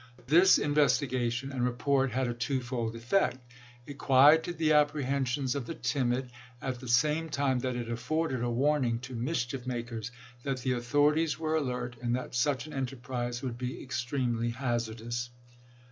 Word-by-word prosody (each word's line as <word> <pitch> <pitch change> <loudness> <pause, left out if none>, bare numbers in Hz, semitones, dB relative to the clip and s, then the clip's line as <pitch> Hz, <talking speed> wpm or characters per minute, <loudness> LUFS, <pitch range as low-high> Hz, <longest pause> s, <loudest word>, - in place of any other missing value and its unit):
This 175 +8 +6
in 145 - 0
vestigation 130 -3 +1
and 130 -3 -2
report 125 +2 +1
had 130 +2 0
a 120 - -1
twofold 120 -2 -2
effect. 125 +3 +1 0.5
It 140 0 -9
quieted 150 +6 +5
the 155 -1 +3
apprehensions 140 -3 +1
of 140 -4 -4
the 165 - -5
timid, 125 -2 -1 0.3
at 130 -2 -4
the 130 - -9
same 150 +7 +2
time 140 -3 +1
that 125 0 -2
it 120 -1 -4
afforded 130 +3 -1
a 120 - 0
warning 130 -1 +1
to 125 0 -8
mischief 125 0 -2
makers 120 -2 -4 0.3
that 135 -1 -3
the 130 - 0
authorities 145 +6 +2
were 160 0 -2
alert 125 -5 -2
and 120 0 0
that 130 - -5
such 135 +2 +1
an 155 - -9
enterprise 125 -2 -4
would 120 -2 -4
be 125 0 -4
extremely 120 -2 -1
hazardous. 120 -1 -3
130 Hz, 160 wpm, -30 LUFS, 120-145 Hz, 0.5 s, This